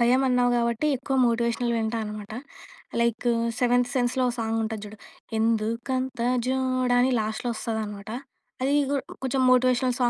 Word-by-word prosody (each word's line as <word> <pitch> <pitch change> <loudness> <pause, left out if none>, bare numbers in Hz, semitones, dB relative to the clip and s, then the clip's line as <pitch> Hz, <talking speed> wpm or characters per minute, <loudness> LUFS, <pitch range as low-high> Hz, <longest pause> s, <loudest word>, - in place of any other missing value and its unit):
భయం 250 +3 +4
అన్నావు 250 -1 +3
కాబట్టి 235 +5 0
ఎక్కువ 270 +2 -3
మోటివేషనల్ 235 +1 0
వింటా 225 0 -1
అన్నమాట. 210 0 -7 0.7
లైకు 235 +1 +1 0.3
'సెవెంత్ 245 0 +3
సెన్స్‌లో' 250 0 +1
ఓహ్! 240 - -6
సాంగ్ 225 0 -1
ఉంటది 220 -1 -4
చూడు. 210 +1 -10 0.4
'ఎందుకంత 230 +3 -1 0.3
జోడా' 255 -1 +1
అని 255 +1 +3
లాస్ట్‌లో 220 +3 -3
వస్తది 220 0 -3
అన్న 210 - -6
మాట. 200 +2 -10 0.5
అది 275 +2 +1 0.2
కూ 285 - +1
హ్మ్. - - -9
కొంచెం 265 0 0
మోటివేషనల్ 255 0 +3
240 Hz, 155 wpm, -26 LUFS, 225-255 Hz, 0.7 s, భయం